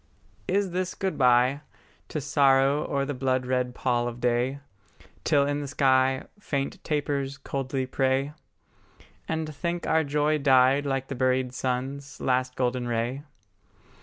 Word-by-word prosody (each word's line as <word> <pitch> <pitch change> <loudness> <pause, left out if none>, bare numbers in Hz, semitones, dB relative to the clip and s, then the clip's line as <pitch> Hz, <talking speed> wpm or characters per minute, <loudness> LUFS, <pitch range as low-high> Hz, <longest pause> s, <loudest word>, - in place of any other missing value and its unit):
Is 195 0 +1
this 185 +1 -2
good 190 -1 -2
bye, 125 +2 +3 0.5
To 155 - -3
sorrow 140 +1 +3
o'er 140 -1 0
the 145 - -3
blood 130 -1 0
red 125 -1 -1
pall 120 -2 0
of 120 0 -6
day, 125 +3 0 0.6
Till 145 -3 +3
in 145 +1 -1
the 145 - -5
sky 130 -1 +2 0.2
Faint 140 -8 -3
tapers 140 -2 -2
coldly 135 -1 -3
pray; 135 +2 0 0.9
And 160 -1 -3
think 170 +3 -3
our 160 0 +2
joy 150 +1 +1
died 135 +1 +4
like 135 -1 -1
the - - -4
buried 130 0 0
sun's 135 +3 -3
Last 130 0 0
golden 125 -1 -1
ray? 120 +3 -1
135 Hz, 140 wpm, -26 LUFS, 130-145 Hz, 0.9 s, died